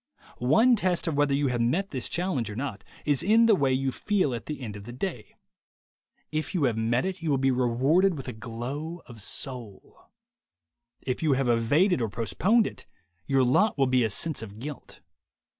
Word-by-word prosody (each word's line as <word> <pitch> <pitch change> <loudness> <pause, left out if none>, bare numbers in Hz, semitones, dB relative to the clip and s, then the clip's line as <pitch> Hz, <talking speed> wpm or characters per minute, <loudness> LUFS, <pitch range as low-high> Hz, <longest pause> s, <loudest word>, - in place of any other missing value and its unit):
One 190 - +4
test 185 -4 0
of 165 - -1
whether 145 -1 +2
you 140 -1 +1
have 120 -1 -1
met 170 +12 0
this 130 -3 -3
challenge 170 - -1
or 105 - -6
not 135 +4 -5 0.2
is 145 -4 +2
in 225 +4 +4
the 225 - +5
way 140 -9 +2
you 130 +1 0
feel 185 - 0
at 115 -2 -6
the 150 -3 -5
end 110 -5 -6
of 100 -1 -9
the 120 - -8
day. 125 - -5 1.0
If 155 +5 -3
you 165 - +1
have 120 -5 +2
met 115 +4 0
it, 190 -1 -4
you 165 - -2
will 140 - +3
be 135 0 +2
rewarded 135 +9 +2
with 135 - -8
a - - -4
glow 130 +9 -6
of 115 -3 -12
soul. 120 -3 -6 1.0
If 125 - -2
you 155 -3 +3
have 135 -1 0
evaded 130 - +3
or 115 - 0
postponed 120 - +1
it, - - -7 0.4
your 135 -1 +3
lot 190 - +3
will 135 - +3
be 130 -1 +2
a 110 - +1
sense 155 +8 0
of 105 -2 -9
guilt. 145 +5 -9
135 Hz, 200 wpm, -27 LUFS, 120-170 Hz, 1.0 s, the